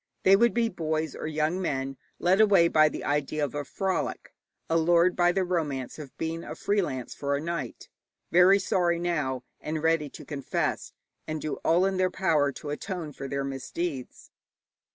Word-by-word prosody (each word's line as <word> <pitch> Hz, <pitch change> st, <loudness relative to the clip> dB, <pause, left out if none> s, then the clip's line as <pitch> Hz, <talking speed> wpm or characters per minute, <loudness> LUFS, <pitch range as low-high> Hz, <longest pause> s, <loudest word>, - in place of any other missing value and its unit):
They 195 Hz, -, +7 dB
would 235 Hz, +3 st, +3 dB
be 235 Hz, -1 st, +3 dB
boys 160 Hz, -5 st, -2 dB
or -, -, -5 dB
young 155 Hz, +4 st, 0 dB
men 135 Hz, -5 st, -2 dB, 0.2 s
led 185 Hz, +4 st, +3 dB
away 195 Hz, -6 st, +6 dB
by 155 Hz, -1 st, +5 dB
the -, -, -6 dB
idea 150 Hz, +1 st, 0 dB
of 140 Hz, -, -7 dB
a 145 Hz, 0 st, -2 dB
frolic, 190 Hz, +5 st, -3 dB, 0.3 s
allured 170 Hz, +2 st, +3 dB
by 175 Hz, 0 st, +4 dB
the 190 Hz, +1 st, +1 dB
romance 155 Hz, -8 st, -2 dB
of 145 Hz, -4 st, -10 dB
being 165 Hz, +1 st, -3 dB
a -, -, -7 dB
free 205 Hz, 0 st, +1 dB
lance 130 Hz, -8 st, -4 dB
for 140 Hz, 0 st, -1 dB
a -, -, -1 dB
night, 160 Hz, -5 st, -5 dB, 0.4 s
very 180 Hz, +3 st, +7 dB
sorry 175 Hz, -3 st, +1 dB
now, 150 Hz, -7 st, -1 dB, 0.2 s
and 155 Hz, 0 st, -4 dB
ready 160 Hz, -2 st, +2 dB
to -, -, -11 dB
confess 140 Hz, -3 st, -2 dB, 0.4 s
and 155 Hz, 0 st, -3 dB
do 155 Hz, 0 st, -3 dB
all 175 Hz, +3 st, +4 dB
in 195 Hz, -1 st, 0 dB
their 185 Hz, 0 st, +2 dB
power 155 Hz, -7 st, +2 dB
to 145 Hz, +2 st, -7 dB
atone 165 Hz, -1 st, -5 dB
for 135 Hz, +1 st, -6 dB
their 140 Hz, +1 st, -2 dB
misdeeds. 135 Hz, +1 st, -5 dB
160 Hz, 180 wpm, -27 LUFS, 145-180 Hz, 0.4 s, They